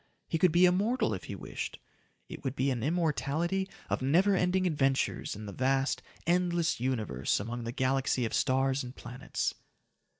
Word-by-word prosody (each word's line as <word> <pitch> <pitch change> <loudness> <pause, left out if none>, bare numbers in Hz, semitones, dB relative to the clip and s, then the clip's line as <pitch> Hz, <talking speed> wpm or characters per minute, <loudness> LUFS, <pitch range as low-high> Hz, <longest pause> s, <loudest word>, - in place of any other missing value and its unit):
He 165 - -1
could 180 0 +5
be 175 +3 +6
immortal 195 - +2
if 95 - -5
he - - -5
wished! - - -5 0.5
It - - -9
would 130 0 -2
be 135 0 +1
an 120 -3 -2
immortality 170 +4 0 0.2
of - - -1
never 180 +9 +4
ending 185 +1 +2
adventures 135 -10 0
in 105 +1 -8
the 100 - -7
vast, 135 +3 +1 0.2
endless 175 -2 +1
Universe 110 - 0
among 115 +3 -4
the 115 - -3
galaxy 130 0 +1
of 110 - -4
stars 135 0 +2
and 125 0 -8
planets. 125 +3 -3
135 Hz, 165 wpm, -30 LUFS, 125-175 Hz, 0.5 s, be